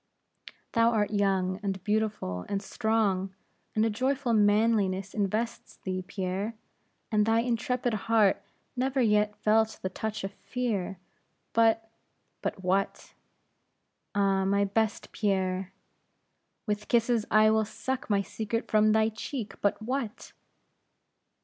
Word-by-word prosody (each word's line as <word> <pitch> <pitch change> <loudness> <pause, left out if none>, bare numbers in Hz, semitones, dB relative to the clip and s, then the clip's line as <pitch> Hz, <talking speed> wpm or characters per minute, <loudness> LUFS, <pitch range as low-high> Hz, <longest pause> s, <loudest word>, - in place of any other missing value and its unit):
"Thou 230 0 +4
art 210 -3 +1
young, 190 -2 +1
and 195 -2 -3
beautiful, 210 - -1
and 200 - 0
strong; 195 -3 0 0.4
and 215 0 +3
a - - +2
joyful 255 +2 0
manliness 205 -2 +2
invests 215 +3 -2
thee, 185 -1 -4
Pierre; 195 +3 -3 0.6
and 210 -1 +4
thy 225 +1 +3
intrepid 245 0 -1 0.2
heart 215 -4 +4 0.3
never 265 +2 0
yet 210 -3 +3
felt 220 +1 +2
the 185 - 0
touch 215 +2 -4
of 195 +1 -4
fear; 210 -6 -3 0.6
But 225 0 +3 0.3
" - - -47
"But 190 - -3
what?" 190 +2 -1 1.0
"Ah, 195 -1 +2
my 200 +1 +2
best 215 +1 -1
Pierre!" 190 -2 -1 0.9
"With 210 -1 -2
kisses 235 -2 +2
I 215 0 +5
will 220 0 +3
suck 260 +4 -4
thy 200 -2 +2
secret 225 +3 -4
from 215 0 +5
thy 220 0 +3
cheek! 220 -1 -5
but 205 - +1
what?" 250 -2 -4
215 Hz, 125 wpm, -28 LUFS, 195-225 Hz, 1.0 s, I